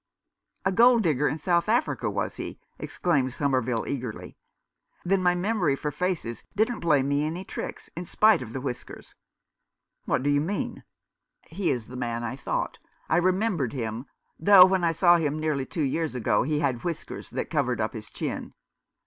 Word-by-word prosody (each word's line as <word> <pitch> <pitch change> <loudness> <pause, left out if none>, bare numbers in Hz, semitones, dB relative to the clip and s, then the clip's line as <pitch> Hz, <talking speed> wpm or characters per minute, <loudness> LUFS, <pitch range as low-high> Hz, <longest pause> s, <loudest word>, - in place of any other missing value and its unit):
"A 190 - +3
gold 235 +3 +5
digger 150 -4 +2
in 145 - -1
South 170 +4 +1
Africa, 235 +3 +1
was - - -3
he?" - - -6 0.2
exclaimed 135 -8 0
Somerville, 130 -5 0
eagerly. 125 -5 -5 0.4
" - - -39
Then 190 +1 +2
my 180 -1 +3
memory 180 -6 +1
for 150 +1 -3
faces 160 -7 -3
didn't 225 +3 +1
play 150 -5 +3
me 140 +2 +1
any 165 +4 -3
tricks - - -6
— - - -47
in 175 +2 -5
spite 215 -1 +4
of 115 -3 -7
the 130 - -5
whiskers." 125 -3 -7 0.9
"What - - 0
do 145 - +2
you 145 0 +3
mean 195 +7 -3 0.2
?" - - -59
" - - -57
He 180 +1 -2
is 120 -4 -1
the 125 - -10
man 120 -1 -3
I 120 - -3
thought. 135 - -3 0.3
I - - +3
remembered 185 - +1
him 115 0 -4 0.2
— - - -46
though 190 -3 +11
when 190 -1 +1
I 170 - +3
saw 175 +1 +5
him 155 -2 -1
nearly 150 -4 -1
two 160 - -2
years 150 +1 -1
ago 110 -4 +2
he 150 +3 0
had 130 -5 -1
whiskers 170 -2 -5
that - - -4
covered 130 -7 0
up 110 0 -1
his 110 -2 -8
chin. - - -5
150 Hz, 190 wpm, -26 LUFS, 130-180 Hz, 0.9 s, though